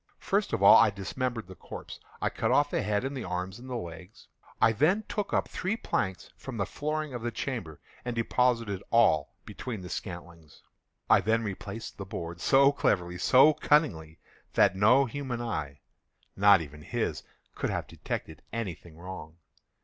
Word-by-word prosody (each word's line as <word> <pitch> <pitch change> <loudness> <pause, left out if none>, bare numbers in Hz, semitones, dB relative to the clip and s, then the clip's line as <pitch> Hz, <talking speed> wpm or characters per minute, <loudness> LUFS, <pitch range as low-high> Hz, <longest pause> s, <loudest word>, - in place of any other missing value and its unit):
First - - 0
of - - -1
all - - +10
I - - +6
dismembered 115 +4 -3
the 95 - -11
corpse. 90 - -9 0.2
I - - +1
cut 110 - -1
off 145 +3 +3
the - - 0
head 105 +3 0
and 135 +1 -3
the 130 - -4
arms 90 +3 -4
and 130 +2 -11
the 125 - -3
legs. 90 -1 -8 0.3
I 110 - +5
then 160 - +2
took 210 -1 -3
up - - +1
three 195 +5 -2
planks 95 - -2
from 130 -3 -7
the 100 - 0
flooring 155 -1 -3
of 120 - -5
the 120 - -1
chamber, 115 - -5 0.2
and 120 -1 -3
deposited 115 -4 +1
all 95 -11 +3
between 115 -6 -6
the 90 - -8
scantlings. 85 -4 -8 0.4
I - - +6
then 115 +1 +1
replaced 100 +2 -6
the 100 - -5
boards 85 -2 -6
so 140 +1 +5
cleverly, 90 -9 0
so 135 +9 +6
cunningly, 125 - +1 0.4
that - - +4
no 125 +8 +5
human 130 -1 -4
eye—not 100 - 0
even 75 -1 -9
his—could - - -4
have - - -2
detected 80 -2 -6
any 115 -5 -3
thing 80 -1 -16
wrong. 85 -2 -9
110 Hz, 170 wpm, -29 LUFS, 90-130 Hz, 0.4 s, all